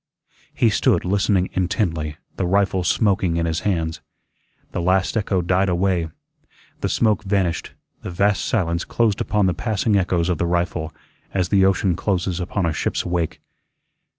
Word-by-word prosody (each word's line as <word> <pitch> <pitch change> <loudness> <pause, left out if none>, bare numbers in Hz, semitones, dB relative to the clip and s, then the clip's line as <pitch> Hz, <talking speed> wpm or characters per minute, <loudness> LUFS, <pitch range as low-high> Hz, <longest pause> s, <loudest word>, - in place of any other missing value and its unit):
He - - +3
stood - - +2
listening 95 0 +1
intently, 85 -5 -1 0.2
the 90 - -1
rifle 95 -1 +2
smoking 95 -4 +1
in 85 - 0
his 80 0 -1
hands. 80 -5 -1 0.7
The - - -2
last 95 +4 +1
echo 100 -4 0
died 90 +2 +2
away. 90 -2 +1 0.7
The - - -1
smoke 110 -2 +2
vanished, 95 -5 -1 0.3
the - - -6
vast 95 -1 +1
silence 85 -5 0
closed 110 -4 0
upon 105 -2 +1
the 90 - +2
passing 110 0 0
echoes 90 -2 +1
of 90 -4 -1
the 85 - +1
rifle 85 -2 -1 0.4
as 90 -2 +1
the 95 -2 +4
ocean 95 -1 +2
closes 90 -3 -1
upon 90 +1 -1
a 80 - 0
ship's - - -2
wake. 85 -2 -2
90 Hz, 155 wpm, -22 LUFS, 85-100 Hz, 0.7 s, the